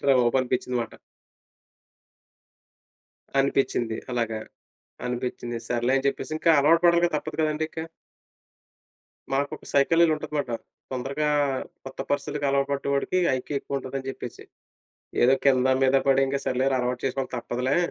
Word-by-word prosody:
Better - - -1
రా - - +6
బాబు! 120 +2 +2
అనిపించింది 125 0 -1
మాట. 115 - -9 2.5
అనిపించింది. 130 -4 +1
అలాగా, 115 -3 -1 0.7
అనిపించింది. 120 -1 -3
సర్లే 120 +2 +1
అని 135 - -2
చెప్పేసి, 140 +3 -4
ఇంకా 165 - +3
అలవాటు 165 +4 +4
పడాలిగా, 170 0 +4
తప్పదు 155 +1 -5
కదండీ! 155 0 0
ఇంకా. 160 0 -5 1.5
మాకు 140 +1 +1
ఒక - - -18
సైకులర్ 165 +4 +5
ఉంటది 150 0 -7
మాట. 140 -4 -2 0.4
తొందరగా 135 +4 -1 0.6
కొత్త 135 0 -8
పరిస్తితికి 145 0 -1
అలవాటు 140 0 +1
పడ్డ 140 - -2
వాడికి 140 +6 +1 0.2
ఐక్యూ 135 +3 -5
ఎక్కువ 140 - -4
ఉంటది, 135 0 -6
అని 130 - -8
చెప్పేసి. 125 -2 -8 0.8
ఏదో 125 +2 +6
కింద 130 -1 +4
మీద 130 +1 +4
పడి, 135 0 +5
ఇంకా 140 +1 -1
సర్లేరా 130 +1 +1
అలవాటు 125 0 -1
చేసుకోవాలి. 135 0 -2
తప్పదులే! 125 +2 -1
135 Hz, 140 wpm, -26 LUFS, 125-145 Hz, 2.5 s, రా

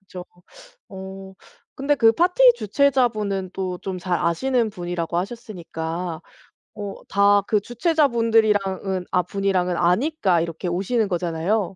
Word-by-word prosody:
그죠? 185 -2 -10 0.6
어 190 0 -9 0.4
근데 280 +2 +1
그 225 -5 +5
파티 365 - +5
주최자분은 215 - +1
또 185 -2 -4
좀 190 -2 -5
잘 180 -1 -1
아시는 230 +7 0
분이라고 175 -3 -4
하셨으니까 175 -5 -5 0.6
어 205 -2 -6
다 200 +1 +4
그 210 - +2
주최자분들이랑은 225 - +1
아 180 - +3
분이랑은 185 -1 -1
아니까 185 - +2
이렇게 165 +1 -4
오시는 200 +6 0
거잖아요. 180 +3 -1
195 Hz, 290 characters per minute, -22 LUFS, 180-225 Hz, 0.6 s, 그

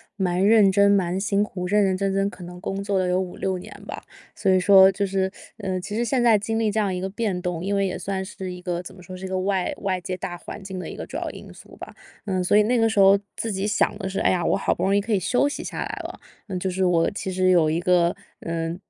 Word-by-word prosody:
蛮 185 -2 0
认 210 -3 +6
真、 200 +1 +4
蛮 190 -2 +2
辛 200 0 +1
苦， 180 -3 -5
认 205 +2 +3
认 190 -1 +1
真 195 0 0
真 195 +1 +1
可 180 -2 -12
能 180 0 -10
工 195 +1 -3
作 200 -1 -1
了 185 - 0
有 180 +1 +2
5-6 190 0 -3
年 180 - -10 0.2
吧， - - -7 0.3
所 - - -1
以 185 - +5
说 190 +1 +7
就 200 +1 -1
是， 190 0 0 0.3
呃， 190 -3 -3
其 205 +3 -6
实 235 +2 0
现 250 0 +1
在 230 -3 +6
经 225 +2 -2
历 220 -2 +1
这 220 - 0
样 200 -3 0
一 180 - -3
个 190 - -3
变 205 -2 -2
动， 175 -2 -3
因 200 +2 -1
为 195 0 +2
也 185 - -3
算 195 -1 -3
是 190 -1 -7
一 180 - -9
个 175 -1 -3
怎 180 - -11
么 180 - -14
说 185 +1 -9
是 185 +1 -7
一 - - -3
个 185 0 -2
外 190 -1 0
外 190 -2 -1
界 185 +1 -4
大 175 -1 -5
环 195 - -9
境 190 -1 -6
的 - - -6
一 - - -7
个 - - -6
主 - - -6
要 - - -3
因 - - -11
素 - - -15
吧。 - - -10 0.3
呃， 190 -3 -1
所 190 +3 +3
以 210 - +6
那 240 +4 +1
个 225 -1 +4
时 220 - -4
候 195 0 +7 0.2
自 225 - -3
己 195 +1 -2
想 210 - +1
的 190 - -3
是： 195 +1 -3
“哎 - - +3
呀， 180 -2 0
我 - - +2
好 195 - +1
不 - - -7
容 195 +1 +2
易 205 - +3
可 225 - -5
以 205 - +3
休 245 +9 +2
息 - - -5
下 - - -6
来 - - -1 0.2
了。” - - -8 0.3
呃， 190 -3 -4
就 190 +1 -2
是 190 +1 0
我 170 -2 +2
其 190 -1 -4
实 185 0 +2
有 165 -4 +4
一 160 +2 0
个 175 -1 +2 0.3
呃， 165 0 -3
190 Hz, 315 characters per minute, -24 LUFS, 180-200 Hz, 0.3 s, 说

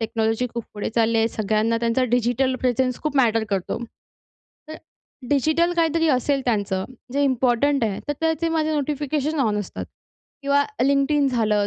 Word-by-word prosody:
Technology 225 +2 0
खूप 235 -2 -4
पुढे 205 - -3
चालली 230 0 +2
आहे. 225 +1 +2
सगळ्यांना 220 +1 0
त्यांचा 235 +2 +1
डिजिटल 245 +2 +1
प्रेझेन्स 255 0 0
खूप 300 -2 -2
मॅटर 230 -4 +3
करतो. 190 -2 -2 0.9
तर 315 - -7 0.5
डिजिटल 315 +5 +2
काहीतरी 325 -1 +2
असेल 275 +1 +1
त्यांचं, 200 -5 0 0.3
जे 285 +1 +1
इम्पोर्टंट 260 0 +2
आहे, 200 -3 -2
तर - - +2
त्याचे 325 0 0
माझे 315 0 +1
नोटिफिकेशन 295 +1 -1
ऑन 210 -4 +1
असतात 205 - -6 0.6
किंवा 280 +1 +2 0.2
Linkedin 280 +1 +2
झालं, 215 -4 +1
255 Hz, 150 wpm, -23 LUFS, 225-290 Hz, 0.9 s, मॅटर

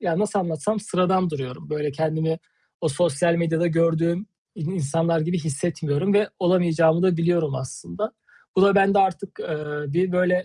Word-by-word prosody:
ya, 175 -5 -1
nasıl 210 0 0
anlatsam 175 +5 -2
sıradan 185 -2 +1
duruyorum. 135 -3 -7
Böyle 150 -1 -1
kendimi 160 +2 -1 0.4
o 160 - +1
sosyal 170 +2 +1
medyada 170 0 +1
gördüğüm 165 +1 +2 0.3
i 195 - -10
insanlar 165 0 0
gibi 175 +4 -1
hissetmiyorum 160 +3 -1
ve 210 0 +3
olamayacağımı 170 -2 +3
da 185 -2 +3
biliyorum 165 -3 +1
aslında. 140 - -5 0.4
Bu 185 - +5
da 200 0 +6
bende 200 0 +4
artık, 190 0 0
eee, 155 -1 -4 0.3
bir, 180 +2 +1
böyle, 180 0 +2
170 Hz, 155 wpm, -23 LUFS, 160-185 Hz, 0.4 s, da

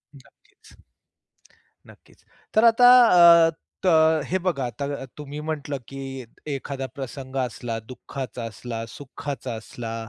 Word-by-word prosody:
नक्कीच. 395 - -21 1.1
नक्कीच. - - -20 0.3
तर 220 - +5
आता 245 +2 +5 0.6
अ, - - +1 0.4
त 160 -3 +4
हे 185 - 0
बघा 170 -8 -1
आता 125 +4 -5 0.3
तुम्ही 145 0 -7
म्हटलं 145 -2 -3
की 135 0 -8 0.4
एखादा 140 -1 -4
प्रसंग 135 0 -7
असला, 120 -2 -3
दुःखाचा 125 -1 -7
असला, 115 0 -6
सुखाचा 140 -1 -7
असला, 115 +1 -7
140 Hz, 115 wpm, -24 LUFS, 125-155 Hz, 1.1 s, तर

